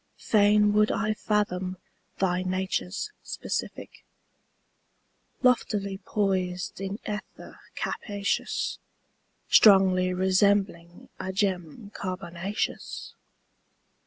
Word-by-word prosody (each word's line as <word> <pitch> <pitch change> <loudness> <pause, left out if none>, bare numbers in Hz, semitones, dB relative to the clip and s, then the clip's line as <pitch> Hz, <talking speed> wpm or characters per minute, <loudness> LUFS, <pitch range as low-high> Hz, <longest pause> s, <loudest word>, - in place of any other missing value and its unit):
Fain 210 -1 +4
would 210 0 +4
I 215 -1 0
fathom 190 -4 -1 0.4
thy 180 -1 +1
nature's 185 - -2
specific - - -5 1.4
Loftily 205 -6 +1
poised 185 -3 -1
in 195 +1 -3
ether 210 0 -7 0.2
capacious. 205 -1 -2 0.7
Strongly 190 -3 +6
resembling 185 -2 +1
a 190 - -3
gem 190 +1 -2
carbonaceous. 185 +1 -4
195 Hz, 75 wpm, -27 LUFS, 185-205 Hz, 1.4 s, Strongly